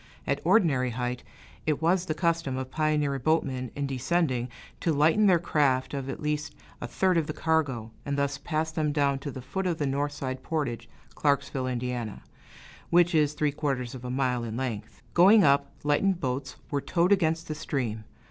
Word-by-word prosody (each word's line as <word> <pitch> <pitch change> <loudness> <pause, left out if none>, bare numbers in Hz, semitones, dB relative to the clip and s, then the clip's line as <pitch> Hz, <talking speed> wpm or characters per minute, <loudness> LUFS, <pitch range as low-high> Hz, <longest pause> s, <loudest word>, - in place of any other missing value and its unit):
At - - -1
ordinary 145 - +3
height, 125 +1 -3 0.5
it 155 -2 +1
was 175 +2 +2
the 155 - -1
custom 165 -6 0
of 130 0 -5
pioneer 150 -3 +1
boatmen, 130 -3 0
in 145 - -2
descending, 130 -1 0 0.3
to 165 - +1
lighten 160 +8 +4
their 180 -3 +6
craft 145 -6 +1
of 135 -1 -4
at - - -5
least 150 0 -2 0.3
a - - -3
third 180 +8 +2
of 155 - -2
the 155 - -3
cargo, 140 -10 0
and 140 0 -2
thus 140 0 -1
pass 160 +1 -2
them 155 -2 0
down 140 -2 +1
to 145 - -5
the 130 -2 -7
foot 190 +8 -3
of 170 -3 0
the 145 - -1
north 140 +2 -1
side 130 -2 -4
portage 125 -8 -3 0.2
(Clarksville, 140 -2 0
Ind.), 125 -3 -3 0.7
which 175 +1 +4
is 150 -2 +3
three 150 -1 0
quarters 135 -5 -2
of 130 -2 -9
a 125 - -5
mile 125 -2 0
in 115 0 -4
length; 115 -5 -5
going 200 +4 +7
up, 140 -1 +3
lightened 170 +6 +2
boats 130 -1 -3 0.2
were 140 -1 0
towed 175 +5 +1
against 165 -4 +2
the 155 - -2
stream. 125 -8 -3
145 Hz, 185 wpm, -27 LUFS, 130-160 Hz, 0.7 s, going